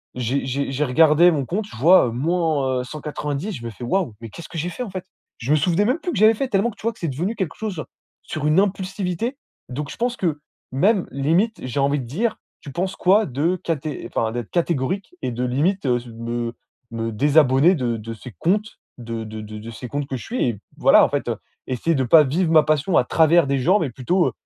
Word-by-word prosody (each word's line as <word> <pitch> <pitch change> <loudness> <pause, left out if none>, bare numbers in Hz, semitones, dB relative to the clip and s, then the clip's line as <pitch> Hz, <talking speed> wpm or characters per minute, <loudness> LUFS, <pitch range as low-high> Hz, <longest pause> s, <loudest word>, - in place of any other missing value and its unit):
j'ai 125 +3 -1
j'ai 135 +1 -2
j'ai 135 +2 0
regardé 160 +5 +5
mon 145 -5 -1
compte, 200 - -2
je - - -12
vois, 165 +5 +6
heu, - - -3
moins, 145 -1 0
heu, - - -5
190, 150 +5 -4
je 120 - -7
me - - -3
fais: 110 - -10
«Waouh, 150 - -1
mais 115 - -7
qu'est-ce 170 - -10
que 170 - -7
j'ai 165 +3 -2
fait, 215 +8 -5
en 235 - -6
fait?» 185 -1 -6 0.3
je 125 +5 -2
me - - +6
souvenais 175 +6 +2
même 255 +9 +1
plus 350 +3 -3
que - - -2
j'avais 215 +3 +6
fait, 265 +5 -2
tellement 225 +1 +1
que, 215 - -19
tu - - -15
vois, 230 - +1
que - - -23
c'est 170 - -2
devenu 175 - -2
quelque 190 -7 -3
chose 200 -8 -4 0.4
sur 150 -1 -3
une 155 +4 +4
impulsivité. 195 +4 -2 0.3
Donc, 140 +3 -5
je - - -7
pense 245 +1 -1
que, 160 -5 -1 0.3
même, 185 - +2
limite, 165 - +1
j'ai 130 +2 -3
envie 140 +1 +2
de 130 - -5
dire, 215 - -1 0.2
tu 140 - -9
penses 185 +7 -2
quoi 200 +4 +3
de 150 +7 0
caté 155 -2 -3
enfin 110 -1 -1
d'être 120 -1 -5
catégorique? 170 +2 -1
Et 130 - -2
de 120 +1 -3
limite, 150 +9 0
heu, 125 -2 +2 0.2
me 115 0 -3 0.4
me 115 0 -3
désabonner 145 - +4
de 120 -6 -1
de 115 +1 -7
ces 115 +3 -10
comptes 210 +5 0 0.2
de 115 -2 -5
de 110 0 -7
de 105 0 -8
de 110 +2 -9
ces 115 +2 -8
comptes 145 +1 -3
que 135 - -3
je - - -9
suis 250 +2 -2
et 110 -4 -5 0.2
voilà, - - +6
en - - -2
fait, - - -2 0.4
essayer 130 +6 0
de 135 - +1
pas 150 +6 +7
vivre 160 +5 0
ma 155 -2 +6
passion 155 +3 +1
à - - +5
travers 165 +2 +4
des 140 0 +1
gens, 180 +10 +4
mais 150 -6 -2
plutôt, 175 +10 +1
heu, - - -1
150 Hz, 240 wpm, -22 LUFS, 125-185 Hz, 0.4 s, pas